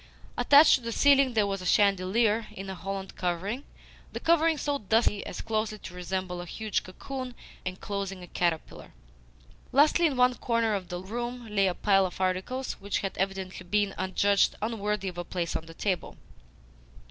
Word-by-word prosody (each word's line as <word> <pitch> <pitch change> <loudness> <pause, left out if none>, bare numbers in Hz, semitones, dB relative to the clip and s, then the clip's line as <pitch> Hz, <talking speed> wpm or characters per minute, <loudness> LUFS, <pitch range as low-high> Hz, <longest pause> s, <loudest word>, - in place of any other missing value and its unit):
Attached 290 +4 +7
to 265 - +3
the 230 0 -4
ceiling 275 0 +4
there 215 -2 +4
was 195 -1 -2
a - - -7
chandelier 205 +3 +3
in 195 -2 -6
a - - -4
holland 195 +1 -6
covering 190 +9 -2 0.5
the - - -3
covering 330 -1 +3
so 285 -1 -1
dusty 215 0 +1
as - - -5
closely 215 -1 -2
to 190 - -10
resemble 180 0 -3
a 175 - -8
huge 215 +3 -2
cocoon 255 +6 -7 0.3
enclosing 195 0 -4
a - - -10
caterpillar. 170 -3 -2 0.8
Lastly, 305 +5 +5
in 275 -4 -2
one 250 0 +5
corner 230 -2 0
of 190 -3 -3
the 175 - -4
room 240 +5 -5
lay 195 -1 +4
a 180 - -1
pile 195 -2 +3
of 180 - -11
articles 190 +8 -1
which 200 0 -2
had 195 - -3
evidently 190 -1 -3
been 205 +2 0
adjudged 195 +2 +2
unworthy 210 -2 -2
of 175 -1 -5
a - - -2
place 170 -1 -3
on 165 - -4
the 165 - -10
table. 190 -1 -2
200 Hz, 175 wpm, -28 LUFS, 185-235 Hz, 0.8 s, Attached